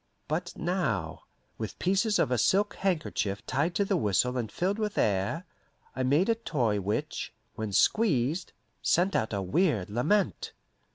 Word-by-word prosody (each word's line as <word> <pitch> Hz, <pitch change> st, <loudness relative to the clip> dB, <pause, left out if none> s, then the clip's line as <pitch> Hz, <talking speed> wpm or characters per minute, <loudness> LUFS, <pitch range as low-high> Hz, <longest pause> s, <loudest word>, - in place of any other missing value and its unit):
But 170 Hz, +3 st, -2 dB
now, 115 Hz, -, -2 dB, 0.3 s
with 110 Hz, -2 st, -5 dB
pieces 195 Hz, +3 st, +2 dB
of -, -, +1 dB
a 125 Hz, -, +2 dB
silk 205 Hz, -, +3 dB
handkerchief 155 Hz, -, -1 dB
tied 150 Hz, +6 st, 0 dB
to 200 Hz, -, +2 dB
the -, -, +1 dB
whistle 110 Hz, +4 st, +1 dB
and 120 Hz, -4 st, -2 dB
filled 195 Hz, +4 st, -1 dB
with 210 Hz, -1 st, -2 dB
air, 100 Hz, -, +1 dB, 0.5 s
I 130 Hz, -, -2 dB
made 145 Hz, +8 st, +3 dB
a 230 Hz, -, +4 dB
toy 125 Hz, -, 0 dB
which, 100 Hz, +3 st, -2 dB, 0.2 s
when 110 Hz, -1 st, -4 dB
squeezed, 160 Hz, -, +2 dB, 0.3 s
sent 185 Hz, +3 st, +2 dB
out 110 Hz, -, +1 dB
a 100 Hz, -2 st, -1 dB
weird 105 Hz, -, +1 dB
lament. 160 Hz, -, 0 dB
145 Hz, 155 wpm, -29 LUFS, -, 0.5 s, a